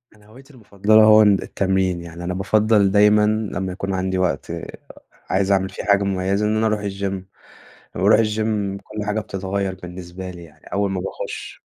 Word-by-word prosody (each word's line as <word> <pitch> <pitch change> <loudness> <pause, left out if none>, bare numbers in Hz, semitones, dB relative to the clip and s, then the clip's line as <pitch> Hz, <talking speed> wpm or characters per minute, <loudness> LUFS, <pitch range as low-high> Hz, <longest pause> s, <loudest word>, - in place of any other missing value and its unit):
أنا 105 - -22
هوايتي 135 +7 -17
المفضلة 110 -1 +3
هو 110 0 +7
ال 100 -2 +4
التمرين، 95 -2 -1
يعني 85 0 -9
أنا 90 - -3
بافضّل 105 +1 +2
دايمًا 105 +1 +5
لمّا 105 -3 -2
يكون 95 +1 -4
عندي 95 0 -1
وقت، 90 -7 -1 0.8
عايز 95 +1 +1
أعمل 95 -1 +2
فيه - - -7
حاجة 100 -1 +3
مميّزة، 100 +1 0
إن 105 +1 +1
أنا 110 0 +2
أروح 110 -1 0
الجيم 100 -1 -3 0.8
لمّا 90 - -3
باروح 105 +2 +6
الجيم 105 -2 -1
كل 105 +1 -7
حاجة 105 +1 -1
بتتغيّر 95 -1 -3
بالنسبة 90 +1 -9
لي 85 -1 -11
يعني 80 -3 -18
أول 100 0 0
ما 95 -2 -2
باخش. 95 - -7
100 Hz, 180 wpm, -21 LUFS, 95-105 Hz, 0.8 s, هو